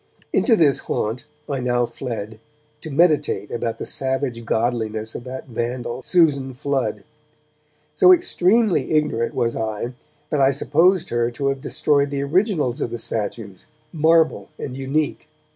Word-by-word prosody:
Into 235 - +4
this 150 - +4
haunt 115 +6 -3 0.2
I 140 -2 -2
now 120 -1 +1
fled 110 -4 -6 0.4
to 160 - -7
meditate 150 - +2
about 115 -1 -2
the - - -5
savage 130 -3 -2
godliness 110 -2 -1
of 120 - -7
that 130 +1 -7
vandal, 120 +1 -3
Susan 140 -5 +2
Flood. 125 -7 -2 0.9
So 370 - +6
extremely 225 - +3
ignorant 150 -7 0
was 115 0 0
I 110 +2 -3 0.4
that 150 - +1
I 135 - +6
supposed 160 +7 +2
her 120 0 +1
to 140 +3 -2
have 135 -1 -3
destroyed 145 0 +1
the 140 0 -2
originals 155 - +1
of - - -1
the 120 - -4
statues, 105 -3 -5 0.3
marble 160 0 +3
and 130 - -6
unique. 140 +3 -2
130 Hz, 145 wpm, -22 LUFS, 115-150 Hz, 0.9 s, So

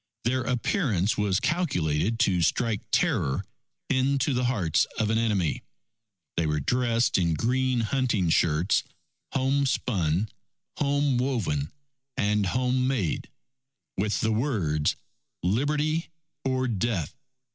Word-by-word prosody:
Their 130 +3 +1
appearance 120 - 0
was 100 -2 +1
calculated 115 - 0
to 90 -3 +3
strike 110 +5 +1
terror 65 -1 +1 0.4
into 135 +2 +1
the 125 0 0
hearts 105 - +2
of 110 0 +1
an 110 - +2
enemy. 105 -8 0 0.8
They 85 -2 +1
were 75 0 0
dressed 115 - +1
in 85 -3 +1
green 125 - +1
hunting 115 -7 +1
shirts, 85 +5 +2 0.5
home 135 +1 +2
spun, 95 -6 0 0.5
home 145 -2 +2
woven, 110 - -1 0.5
and 105 -1 +1
home 125 +4 +1
made, 110 - -1 0.7
with 105 +2 0
the 110 - +1
words, 100 - 0 0.5
_Liberty 150 - +1 0.4
or 130 -1 0
Death! 105 -7 -1
115 Hz, 115 wpm, -27 LUFS, 90-130 Hz, 0.8 s, to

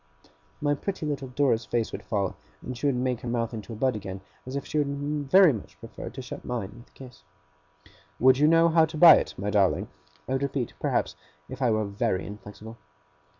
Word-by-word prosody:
My 145 0 +2
pretty 175 +3 -4
little 140 -3 -3
Dora's 125 -3 +1
face 115 -2 -1
would - - -6
fall, 100 -4 -2 0.3
and 125 - -5
she 135 +4 -1
would 140 - +2
make 125 -1 -1
her - - -6
mouth 115 0 -1
into 110 0 -7
a - - -5
bud 130 +3 0
again, 95 -2 -6 0.3
as 130 - -5
if 140 - -3
she 155 - -1
would 145 0 -2
very 185 -4 +7
much 110 - -9
prefer 115 - -8
to 130 - -8
shut - - -8
mine 115 -6 -4
with 120 +2 -15
a - - -35
kiss. 125 - -13 1.0
'Would 130 +1 +5
you 150 - +5
know 165 +1 +5
how 160 -1 +5
to 155 0 -8
buy 165 -1 +10
it, - - -3
my 100 +2 -2
darling?' 100 -3 +2 0.4
I - - -5
would 135 - 0
repeat, 140 -3 -2
perhaps, - - -1 0.3
if 130 +1 -9
I 125 - +3
were 110 -1 +1
very 100 -1 -1
inflexible. 105 +2 -10
125 Hz, 215 wpm, -26 LUFS, 110-145 Hz, 1.0 s, buy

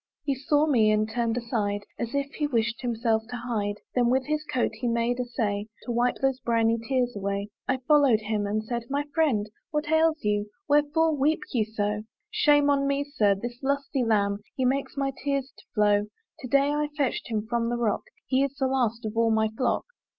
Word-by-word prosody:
He 285 -1 0
saw 290 +3 +2
me, 235 -8 +4
and 215 0 +2
he 220 - -10
turned 235 -1 0
aside, 210 -4 -1 0.2
As 235 +3 -3
if 280 0 -1
he 300 -1 -1
wished 230 -3 0
himself 230 -2 +1
to 245 - -5
hide: 225 -4 -2 0.2
Then 245 -1 +3
with 260 +1 +2
his 305 0 -1
coat 250 - +1
he 220 +3 -3
made 235 +1 0
essay 215 -4 -2 0.2
To 245 - -4
wipe 240 +1 +2
those 270 -1 +2
briny 230 -1 +2
tears 245 +1 0
away. 200 0 -2 0.2
I 265 - +1
follow'd 280 -7 +5
him, 210 -1 -1
and 215 +1 -1
said, 235 +1 -3
"My 285 +1 0
friend 265 -11 +2 0.2
"What 300 0 -2
ails 320 0 +3
you? 210 0 0 0.2
wherefore 295 +2 +3
weep 295 +3 +2
you 225 -4 +2
so?" 210 -1 -2 0.3
"Shame 290 -1 +4
on 280 -1 +2
me, 280 0 +1
Sir! 215 -9 +2
this 240 +4 -7
lusty 275 -1 0
lamb, 200 -3 +1 0.2
He 260 - 0
makes 275 +2 0
my 275 -1 0
tears 275 -1 -1
to - - -17
flow. 205 -1 +3 0.3
To 255 - -6
day 280 +3 +3
I 295 0 0
fetched 275 -4 0
him 215 -2 -1
from 235 0 0
the 240 - -1
rock; 230 -3 0 0.2
He 265 0 +2
is 275 0 -2
the 270 -2 0
last 240 -4 0
of 215 0 -4
all 230 0 +3
my 220 0 +2
flock. 230 +3 -1
240 Hz, 210 wpm, -27 LUFS, 220-280 Hz, 0.3 s, follow'd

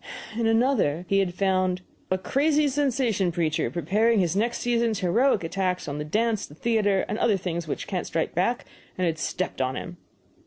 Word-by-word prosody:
In 230 0 +1
another, 225 - +2
he 195 - +3
had 180 -3 0
"found 185 -1 +1 0.3
a 185 - +1
crazy 290 +9 +2
sensation 255 -9 +1
preacher 160 -2 0
preparing 205 +7 +2
his 175 -2 +1
next 235 +4 +1
season's 235 -3 0
heroic 210 +4 +2
attacks 185 +2 -1
on 145 0 -4
the - - -2
dance, 215 +7 0
the 145 - -14
theater, 205 -1 +1
and 215 - -3
other 210 -4 +3
things 170 -2 -4
which - - -3
can't 185 -3 -3
strike 160 - -1
back, 190 +8 0 0.3
and 185 - +1
had 160 -2 -1
stepped 185 -4 -2
on 130 0 0
him." 175 0 -6
195 Hz, 185 wpm, -25 LUFS, 175-230 Hz, 0.3 s, he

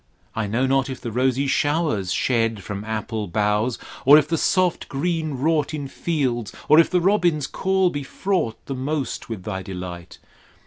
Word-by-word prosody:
I 110 -2 -1
know 115 +6 +1
not 135 0 +1
if 130 - -5
the 120 -2 -5
rosy 130 +3 +1
showers 145 - 0
shed 115 -4 0
From 100 +1 -5
apple 110 -1 -3
boughs, 105 +5 0 0.3
or 140 +2 +9
if 150 -1 +3
the 165 - 0
soft 180 +2 +1
green 160 +1 -1
wrought 155 +2 0
In 145 -2 -4
fields, 130 - -2 0.2
or 155 - +7
if 165 - +5
the 180 - +2
robin's 175 -6 +2
call 190 +3 +1
be 145 - -3
fraught 160 - -1
The 135 - -4
most 135 -2 -3
with 110 -5 -5
thy 95 -2 -4
delight. 90 -2 -7
130 Hz, 175 wpm, -23 LUFS, 110-155 Hz, 0.3 s, or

